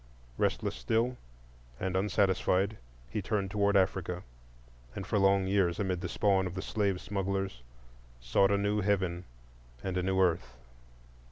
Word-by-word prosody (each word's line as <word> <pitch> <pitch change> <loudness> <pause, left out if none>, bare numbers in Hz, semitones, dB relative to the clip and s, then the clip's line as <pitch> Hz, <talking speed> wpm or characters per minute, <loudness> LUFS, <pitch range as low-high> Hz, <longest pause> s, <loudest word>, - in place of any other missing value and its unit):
Restless - - 0
still, 115 +3 0 0.6
and 95 -1 -2
unsatisfied, 95 0 +1 0.3
he 105 - -1
turned 100 -1 -1
toward 100 -1 +3
Africa, 90 -1 0 0.7
and 95 - -5
for 105 +2 +1
long 95 0 +4
years, 95 -3 +2
amid 95 -3 -1
the 90 - -3
spawn 95 -2 +2
of 90 - -7
the 95 - -3
slave 100 -4 0
smugglers, 95 -9 -2 0.6
sought - - +3
a 100 - +3
new 100 +1 +1
heaven 95 -3 0 0.6
and 95 -1 -2
a - - +1
new 95 +1 0
earth. 85 -8 +1
95 Hz, 145 wpm, -31 LUFS, 90-100 Hz, 0.7 s, long